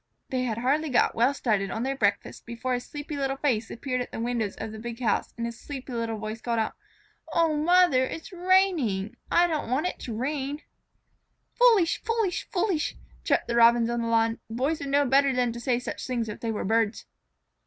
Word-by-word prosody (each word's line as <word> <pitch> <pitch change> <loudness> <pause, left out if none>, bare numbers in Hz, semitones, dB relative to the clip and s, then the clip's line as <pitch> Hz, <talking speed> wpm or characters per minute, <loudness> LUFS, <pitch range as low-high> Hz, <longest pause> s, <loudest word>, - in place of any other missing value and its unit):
They 255 -1 0
had 225 -3 -2
hardly 285 +6 +1
got 250 - +3
well 240 +4 +3
started 215 -8 0
on 225 +5 -3
their 270 +1 -1
breakfast 200 -5 -1
before 235 +2 -3
a 245 - 0
sleepy 290 +3 -7
little 270 -1 -1
face 240 -6 0
appeared 255 +1 -3
at 245 - -6
the - - -6
window 230 -2 -1
of 220 - -5
the 220 - -8
big 235 +1 -6
house 235 -4 0
and 235 - -2
a 235 - -3
sleepy 260 +2 -8
little 230 -1 -2
voice 215 +1 -6
called 235 0 -1
out: 220 -1 0 0.6
"O 330 -2 +3
Mother, 320 -3 +4
it 290 +5 -4
is - - -13
raining! 345 - +2
I 345 - +5
didn't 315 -8 -2
want 265 +7 +1
it 360 - -3
to 230 - -5
rain." 280 +3 -3 0.9
"Foolish! 455 -9 +4
Foolish! 450 -5 -1
Foolish!" 365 -5 0 0.3
chirped - - +1
the 235 - -1
Robins 235 0 +5
on 240 0 -1
the 230 - -2
lawn. 225 0 +2
"Boys 265 +8 -1
would 280 - -5
know 285 +1 +3
better 275 +1 +3
than 250 -1 +1
to 235 - -7
say 245 0 +1
such 250 - -5
things 240 -3 -1
if 210 - -6
they 230 - -3
were 215 - -3
birds." 225 +1 +1
250 Hz, 210 wpm, -27 LUFS, 230-295 Hz, 0.9 s, I